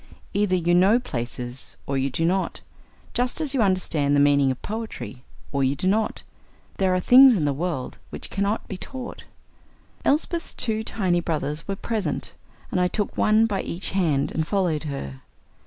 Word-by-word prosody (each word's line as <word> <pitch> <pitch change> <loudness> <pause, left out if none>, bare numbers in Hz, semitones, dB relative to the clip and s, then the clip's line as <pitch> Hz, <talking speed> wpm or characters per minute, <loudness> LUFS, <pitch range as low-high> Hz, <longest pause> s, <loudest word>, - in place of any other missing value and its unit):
Either 200 -2 +2
you 175 -1 +1
know 190 +6 +5
"places" 120 - -6
or 140 - -2
you 135 +1 +1
do 165 +5 -1
not 185 +3 0 0.5
just 250 +3 0
as 300 -4 +1
you 265 - +2
understand 170 -8 +2
the - - +4
meaning 140 -1 +4
of 130 - -2
poetry 215 - -6 0.3
or 140 -1 0
you 135 +1 +2
do 165 - -3
not. 215 +3 0 0.5
There 190 -1 +2
are - - +2
things 255 +5 +8
in 160 -7 0
the 145 - +1
world 150 -3 -3
which - - -8
cannot 200 +2 -1
be 195 - -5
taught. 255 +4 -7 0.8
Elsbeth's 330 +3 +1
two 220 -2 -1
tiny 190 -5 0
brothers 155 -2 -3
were 195 - -2
present, 200 -7 -3 0.4
and 180 - +1
I 180 - +3
took 205 +3 -2
one 215 +1 +4
by 205 -3 -1
each 175 +4 -4
hand 160 -8 +1
and 160 -1 -2
followed 175 -6 0
her. 70 - -6
180 Hz, 175 wpm, -24 LUFS, 145-215 Hz, 0.8 s, things